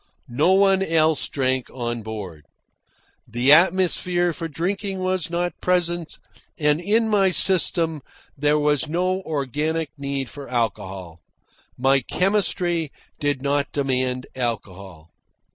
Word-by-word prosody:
No 155 +9 +3
one 195 0 +4
else 160 -4 +2
drank 130 -2 -1
on 120 -2 -4
board. 95 -9 -8 0.8
The 120 +4 +2
atmosphere 175 +1 +3
for 165 - -5
drinking 190 +5 -3
was 185 -1 -1
not 175 +1 -1
present, 175 -2 0 0.4
and 150 +1 +1
in 220 +5 +2
my 200 -3 +3
system 170 -4 +2 0.3
there 150 +1 +2
was 150 +1 +1
no 185 +3 0
organic 155 0 -2
need 140 -1 -3
for 140 0 -10
alcohol. 95 -8 -3 0.6
My 135 +2 +3
chemistry 175 - 0 0.3
did 145 -2 -1
not 140 0 0
demand 130 -2 -1
alcohol. 95 -9 -5
150 Hz, 115 wpm, -23 LUFS, 130-175 Hz, 0.8 s, one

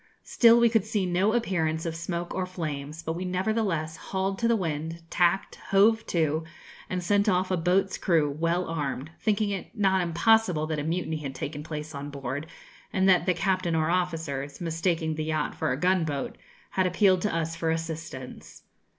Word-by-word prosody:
Still 235 -1 +5
we 235 - +6
could 225 -3 +2
see 215 -2 -1
no 185 +4 +2
appearance 165 -9 0
of 165 -1 -2
smoke 170 +1 -4
or 185 -1 -2
flames, 155 -3 -5
but 160 - -2
we 175 +2 -4
nevertheless 185 -4 -1
hauled 195 0 -2
to 235 - +2
the 235 - +4
wind, 165 -3 -3
tacked, 175 +2 +1
hove 220 +3 +5
to, 160 -2 +1 0.5
and 180 -1 -2
sent 205 +3 +3
off 185 0 +1
a - - +3
boat's 185 +3 +1
crew, 165 -5 +3
well 165 +4 0
armed, 150 -2 -3
thinking 210 -1 +1
it 200 +4 -6
not 190 -2 +3
impossible 180 -1 +3
that 155 -1 -2
a - - -2
mutiny 160 0 -1
had 140 -3 -6
taken 145 -1 -5
place 150 0 -6
on 140 +1 -5
board 140 +1 -5 0.4
and 190 0 +2
that 185 -1 +4
the 180 - +3
captain 185 -1 0
or 160 +1 +1
officers, 160 -6 -2
mistaking 165 -1 -1
the 155 0 -3
yacht 155 -1 -1
for - - -1
a 125 - -2
gunboat, 160 -5 0 0.4
had 190 -1 +2
appealed 185 0 +3
to 210 -4 -1
us 165 0 -1
for 165 - -1
assistance. 160 -5 -5
170 Hz, 185 wpm, -27 LUFS, 155-190 Hz, 0.5 s, we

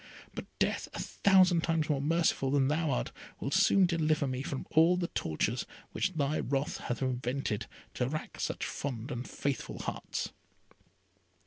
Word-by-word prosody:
But - - -5
death, - - 0
a - - -4
thousand 185 -3 +4
times 165 -2 +1
more 145 -3 +1
merciful 155 -3 +2
than 135 -1 +3
thou 160 +1 +1
art, - - -1 0.3
will 135 - -3
soon 195 +1 +5
deliver 155 -4 +2
me 130 -1 -2
from 135 0 -4
all 165 +3 +5
the 175 -1 -1
tortures 80 - -1 0.2
which 185 - 0
thy 150 -1 0
wrath 140 +2 -1
hath 120 +2 -3
invented, 125 -3 -1 0.3
to 125 - 0
rack 155 +2 -5
such - - -2
fond 130 -1 -4
and 125 -1 -4
faithful 140 -1 -2
hearts." - - -3
145 Hz, 155 wpm, -31 LUFS, 130-165 Hz, 0.3 s, soon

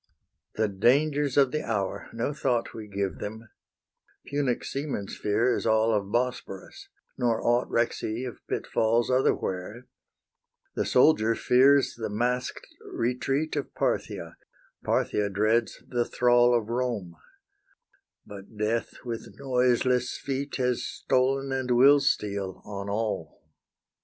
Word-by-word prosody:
The 110 0 +1
dangers 140 +8 +2
of 135 -3 +5
the 155 0 -2
hour! 100 -4 -3
no 115 +5 -2
thought 125 -5 -1
We 110 -2 -8
give 100 -6 -3
them; 110 +2 -7 0.8
Punic 140 -3 -1
seaman's 135 -8 -4
fear 115 +4 +1
Is - - -2
all 110 0 +3
of 100 -2 -1
Bosporus, 120 -5 -3 0.3
nor 120 -2 +1
aught 120 +1 +1
Recks 115 0 0
he 110 +4 -3
of 125 -4 -6
pitfalls 115 +2 0
otherwhere; 115 -3 -1 0.9
The - - -1
soldier 125 -4 +4
fears 135 +4 +4
the 115 - -5
mask'd 125 +4 -2 0.3
retreat 135 +6 -1
Of 145 - -4
Parthia; - - -2 0.5
Parthia 105 -1 0
dreads 110 +4 0
the 120 -1 0
thrall 120 0 +4
Of 110 -1 -4
Rome; 115 -8 -2 1.1
but 100 +1 -12
Death 110 +2 -1
with 115 -2 -6
noiseless 125 -1 +1
feet 140 +1 -4
Has 125 -2 0
stolen 135 +1 0
and 130 -1 -2
will 135 +4 +6
steal 100 -8 -1
on 100 -1 -6
all. 110 +1 -3
120 Hz, 125 wpm, -27 LUFS, 105-130 Hz, 1.1 s, will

